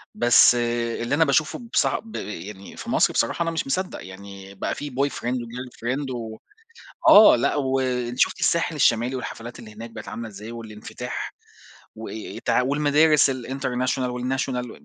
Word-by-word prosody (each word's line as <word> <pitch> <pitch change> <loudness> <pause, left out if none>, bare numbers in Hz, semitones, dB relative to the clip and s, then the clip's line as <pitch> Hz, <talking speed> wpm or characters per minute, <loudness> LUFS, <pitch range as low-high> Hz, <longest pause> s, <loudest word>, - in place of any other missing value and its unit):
بس 120 0 +6
اللي 120 +1 -1
أنا 160 +2 +4
باشوفه 145 +1 +1
بص - - +4
ب 225 - -4
يعني 100 0 -7
في - - -7
مصر - - +3
بصراحة 170 - +1
أنا 165 - -1
مش 165 -3 -3
مصدّق، 185 +7 -3
يعني 100 +1 -11
بقى - - -3
في 145 - -6
boyfriend 130 -2 -1
وgirlfriend 125 +2 -4
و 110 -2 -6 0.7
آه 210 +1 +9
لأ 120 - +1
و 135 -2 0
أنتِ 125 -1 -2
شُفتِ - - +2
الساحل 170 -1 +1
الشمالي 120 -2 +2
والحفلات 120 -2 -7
اللي 110 -3 -11
هناك 115 +2 -8
بقِت 110 -1 -9
عاملة 115 -1 -6
إزاي، 105 +2 -9
والانفتاح 110 -2 -7 0.6
وإيه 110 0 -7
إيه 105 - -7
تع - - +3
والمدارس 145 +2 +4
الinternational 130 0 -2
والnational 125 0 -3
125 Hz, 160 wpm, -24 LUFS, 115-135 Hz, 0.7 s, آه